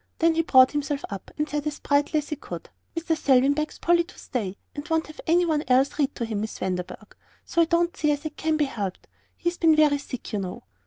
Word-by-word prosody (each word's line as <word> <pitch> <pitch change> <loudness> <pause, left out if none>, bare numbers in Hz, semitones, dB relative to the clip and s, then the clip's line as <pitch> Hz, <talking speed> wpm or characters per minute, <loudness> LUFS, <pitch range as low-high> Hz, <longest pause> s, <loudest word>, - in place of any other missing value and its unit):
Then 330 0 +3
he 325 - +2
brought 260 -5 +6
himself 290 -1 -2
up, 195 -2 -7
and 300 0 0
said 295 0 -2
as 295 - -3
brightly 290 +2 +1
as 295 - -2
he 300 - -2
could: - - -9 0.3
"Mr. 330 0 0
Selwyn 275 -2 +4
begs 305 +1 -3
Polly 345 0 +3
to - - -16
stay, 205 -7 -4 0.2
and 290 +3 -7
won't 320 0 +1
have 310 - -11
any 350 +2 +4
one 310 -3 +1
else 265 +4 +3
read 285 -1 +1
to 235 - -2
him, 215 -2 -3
Miss 220 - -4
Vanderburgh, 185 - -5 0.3
so 340 - +2
I - - +5
don't 340 +1 +1
see 300 -1 +1
as 290 +1 -2
it 305 -1 -5
can 315 -1 0
be 300 - +2
helped. 205 -8 -5 0.3
He's 345 0 -2
been 320 -2 +5
very 300 -2 +4
sick, 255 -5 -7
you 210 - 0
know." 185 -2 -6
295 Hz, 245 wpm, -25 LUFS, 260-320 Hz, 0.3 s, brought